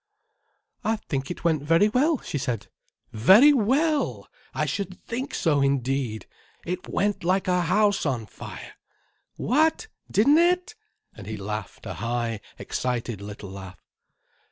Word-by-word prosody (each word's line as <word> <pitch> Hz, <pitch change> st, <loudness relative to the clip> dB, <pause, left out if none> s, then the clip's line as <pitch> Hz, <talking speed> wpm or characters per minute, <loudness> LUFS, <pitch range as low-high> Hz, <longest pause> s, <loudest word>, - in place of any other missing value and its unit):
"I 220 Hz, +2 st, +1 dB
think 135 Hz, -10 st, -4 dB
it 175 Hz, -, -6 dB
went 160 Hz, -4 st, +2 dB
very 165 Hz, +7 st, +4 dB
well," 280 Hz, +8 st, +2 dB
she 145 Hz, -, -4 dB
said. 120 Hz, -4 st, -3 dB, 0.4 s
"Very 195 Hz, -, +7 dB
well! 285 Hz, +6 st, +1 dB, 0.2 s
I -, -, -1 dB
should 195 Hz, -2 st, -4 dB
think 255 Hz, +4 st, -4 dB
so, 150 Hz, -4 st, +2 dB
indeed. 135 Hz, -4 st, 0 dB, 0.4 s
It 180 Hz, +1 st, -4 dB
went 205 Hz, 0 st, 0 dB
like 185 Hz, +2 st, +1 dB
a 180 Hz, -1 st, +2 dB
house 200 Hz, +4 st, +2 dB
on 125 Hz, -7 st, -1 dB
fire. -, -, -10 dB, 0.6 s
What? 315 Hz, -, +1 dB, 0.2 s
Didn't 280 Hz, +9 st, +5 dB
it?" 360 Hz, +4 st, +2 dB, 0.4 s
And 105 Hz, -3 st, -11 dB
he 110 Hz, 0 st, -4 dB
laughed 105 Hz, -1 st, -6 dB
a -, -, -4 dB
high, 115 Hz, -2 st, -2 dB, 0.2 s
excited 120 Hz, -4 st, -3 dB
little 100 Hz, -1 st, -8 dB
laugh. 95 Hz, -1 st, -9 dB
170 Hz, 135 wpm, -25 LUFS, -, 0.6 s, Very